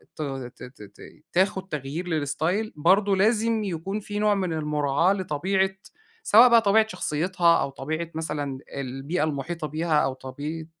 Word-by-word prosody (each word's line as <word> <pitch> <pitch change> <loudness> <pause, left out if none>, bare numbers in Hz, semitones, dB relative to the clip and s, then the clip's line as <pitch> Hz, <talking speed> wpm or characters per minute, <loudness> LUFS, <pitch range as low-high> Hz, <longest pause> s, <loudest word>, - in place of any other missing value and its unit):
تغي 135 -4 -5
ت - - -15
ت 125 -3 -12
ت 100 0 -16 0.3
تاخد 190 +1 +1
تغيير 150 +2 -5
للاستايل، 160 +7 -1
برضو 195 +6 +3
لازم 220 +2 +2
يكون 195 +2 -3
في 205 0 -5
نوع 210 -1 +3
من 185 -4 -1
المراعاة 150 +2 +1
لطبيعة، 190 +1 0 0.5
سواء 240 - +7
بقى 230 -1 +6
طبيعة 220 +1 +4
شخصيتها، 175 -1 +1
أو - - -1
طبيعة 155 +5 -4
مثلًا 145 -4 -3 0.2
البيئة 140 +5 -3
المحيطة 155 +2 -3
بيها، 155 +2 0
أو 135 - 0
طبيعة، 145 +5 -6
165 Hz, 150 wpm, -25 LUFS, 145-195 Hz, 0.5 s, سواء